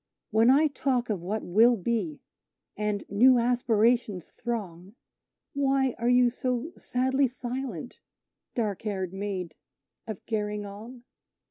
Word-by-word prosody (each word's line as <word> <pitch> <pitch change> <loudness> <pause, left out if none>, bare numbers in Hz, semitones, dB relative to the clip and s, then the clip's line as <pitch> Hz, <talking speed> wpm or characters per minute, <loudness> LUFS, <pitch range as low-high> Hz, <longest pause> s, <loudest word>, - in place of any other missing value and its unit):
When 225 +2 +4
I 285 +4 +6
talk 260 -5 0
of 195 -5 -2
what 205 +5 -3
we - - -9
will 230 +6 +5
be, 235 - -2 0.5
and 210 -1 -2
new 250 +6 +5
aspirations 235 -4 +1
throng, 200 -5 -5 0.6
Why 270 -2 +1
are 235 +1 +1
you 245 -1 +5
so 250 +5 -2
sadly 260 +2 +1
silent, 245 - -6 0.6
dark 210 -6 -1
haired 190 -4 -3
Maid 190 -4 -4 0.5
of 220 -4 -7
Gerringong?" 210 +2 -4
235 Hz, 120 wpm, -27 LUFS, 205-250 Hz, 0.6 s, I